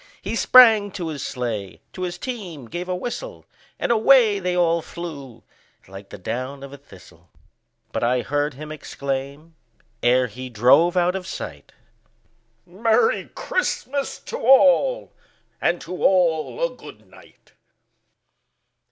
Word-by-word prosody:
He 205 +4 -4
sprang 225 -4 +6
to 175 -4 -4
his 150 -3 -6
sleigh, 110 -7 -4
to 185 - -8
his 175 -1 -3
team 185 - -7
gave 175 +6 -6
a 180 - 0
whistle, 360 - -6 0.3
And - - -1
away 225 -2 +5
they 180 -1 -2
all 170 -1 +2
flew 140 -10 -9 0.4
like 95 +1 -12
the - - -9
down 130 +8 -5
of 140 0 -10
a - - -9
thistle; 90 - -18 0.6
But - - -3
I 125 +1 +2
heard 145 0 -1
him 155 +2 -9
exclaim, 140 +1 -5 0.5
ere 125 +1 +3
he 125 +2 -8
drove 125 - +4
out 180 +1 +2
of 190 -1 -5
sight, 70 - -8 0.9
"Merry 225 - +1
Christmas 285 - -2
to 475 - -6
all, 280 - +4 0.5
and 170 0 +1
to 180 +1 -7
all 180 - +2
a - - -5
good - - -14
night!" - - -20
170 Hz, 135 wpm, -22 LUFS, 130-210 Hz, 0.9 s, sprang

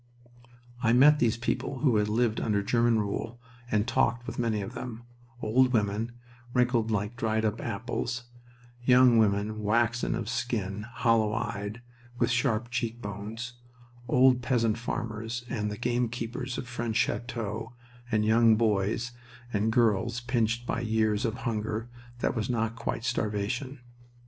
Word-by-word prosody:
I 115 -1 +3
met 145 +4 +7
these 115 -2 +2
people 120 +3 -2
who 130 -7 +4
had 105 0 +1
lived 115 0 +1
under 100 -2 +1
German 115 +2 +3
rule 110 +3 -3 0.3
and 105 0 +1
talked 120 -1 +1
with - - -6
many 115 -3 +1
of 95 - -7
them 120 -2 -6 0.4
old 125 +4 +3
women, 110 +1 0 0.4
wrinkled 120 -2 +2
like 105 +1 -1
dried 110 -1 0
up 110 +1 -1
apples, 120 +3 -3 0.6
young 125 -1 +6
women 105 0 +1
waxen 115 +3 +1
of 115 -2 -4
skin, 110 -4 -2
hollow 115 -2 +2
eyed, 105 +3 -4 0.3
with 120 0 +2
sharp 120 -1 0
cheekbones, 115 -1 -4 0.5
old 125 -1 +5
peasant 115 -3 +1
farmers 115 0 -4
and 105 -3 -1
the 105 - -5
gamekeepers 120 +1 -2
of 125 - -5
French 120 -3 -3
chateaux, 115 -1 -2 0.4
and 105 -1 +2
young 115 0 +5
boys 110 +1 +1 0.4
and 105 +2 +1
girls 115 0 +2
pinched 120 -1 0
by 120 - -1
years 110 -1 +1
of 115 -1 -1
hunger 110 0 -2 0.3
that - - 0
was 110 -1 -2
not 115 -2 0
quite 115 -1 -3
starvation. 120 +3 -2
115 Hz, 140 wpm, -28 LUFS, 110-120 Hz, 0.6 s, met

